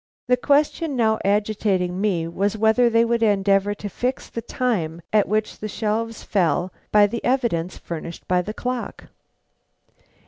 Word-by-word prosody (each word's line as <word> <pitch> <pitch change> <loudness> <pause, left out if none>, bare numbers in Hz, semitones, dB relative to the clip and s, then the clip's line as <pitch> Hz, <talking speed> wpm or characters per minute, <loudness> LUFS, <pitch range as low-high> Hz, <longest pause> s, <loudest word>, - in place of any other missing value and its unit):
The 250 - +4
question 290 +3 +1
now 220 -3 +2
agitating 200 -3 0
me 180 -6 0
was 200 +5 -1
whether 220 +3 +4
they 230 0 +3
would 235 0 0
endeavor 200 -1 +2
to 205 - -6
fix 250 +6 -3
the 230 - -5
time 180 -10 -2
at 210 -2 +4
which 215 +1 -1
the 215 - -4
shelves 220 +2 -2
fell 175 -1 0 0.2
by 210 -1 +6
the 230 +3 -4
evidence 235 -10 0
furnished 170 0 -7
by 180 0 +2
the 205 - -5
clock. 250 -1 -5
210 Hz, 150 wpm, -22 LUFS, 190-235 Hz, 0.2 s, by